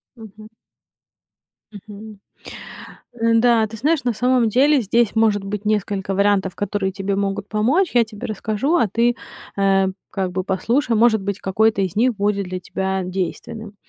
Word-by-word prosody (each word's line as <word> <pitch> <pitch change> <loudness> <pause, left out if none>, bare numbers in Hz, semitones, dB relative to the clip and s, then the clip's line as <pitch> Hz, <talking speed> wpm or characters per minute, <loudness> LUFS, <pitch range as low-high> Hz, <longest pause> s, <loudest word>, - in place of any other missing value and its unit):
Мгм. 215 -2 -13 1.2
Мгм. 210 0 -11 1.0
Н-да, 230 -1 +3
ты 220 +1 -9
знаешь, 290 +5 0
на 245 - +1
самом 245 +1 +2
деле 275 +6 +3
здесь 230 +1 +1
может 215 -2 +2
быть 205 +1 -5
несколько 200 -2 -1
вариантов, 200 -1 +1
которые 205 -1 -2
тебе 195 0 -3
могут 200 0 -2
помочь. 265 - +1
Я 240 -1 +5
тебе 210 -2 -8
расскажу, 220 - -1
а 230 - +2
ты, 235 +4 +1 0.4
э, 195 -1 +3 0.2
как 190 -2 -3
бы 185 +1 -2
послушай. 230 +7 0
Может 220 -2 +3
быть, 200 0 -3
какой-то 210 +1 +1
из 185 -3 -3
них 245 +2 +2
будет 200 0 0
для 185 0 -4
тебя 190 +1 -3
действенным. 200 +4 -5
210 Hz, 150 wpm, -20 LUFS, 195-230 Hz, 1.2 s, Я